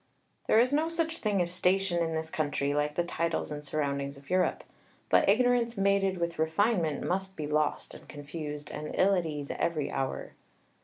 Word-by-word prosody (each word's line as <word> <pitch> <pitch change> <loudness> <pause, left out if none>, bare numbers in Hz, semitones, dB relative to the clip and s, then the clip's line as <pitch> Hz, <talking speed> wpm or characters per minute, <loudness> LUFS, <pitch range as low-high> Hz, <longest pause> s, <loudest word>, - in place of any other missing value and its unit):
_ - - -29
There 220 - +5
is 250 +4 +3
no 310 +3 +2
such 330 0 -1
thing 205 -4 +1
as 170 - -1
station 180 -1 +2
in 165 -1 -2
this 160 0 -3
country, 145 -2 0
like 150 0 0
the 175 - +1
titles 170 -2 -2
and 150 0 -5
surroundings 140 -1 -2
of 140 +4 -14
Europe; 185 0 +1 0.5
but - - +4
ignorance 240 +1 +3
mated 195 -1 +2
with 170 -1 -2
refinement 160 -1 +1
must 190 +1 -1
be 155 - -3
lost 150 0 0
and - - -13
confused, 150 0 -6
and 150 - -5
ill 195 +1 +4
at 180 -3 +1
ease 145 -2 -4
every 155 -4 0
hour. 135 - -3
170 Hz, 190 wpm, -29 LUFS, 150-195 Hz, 0.5 s, There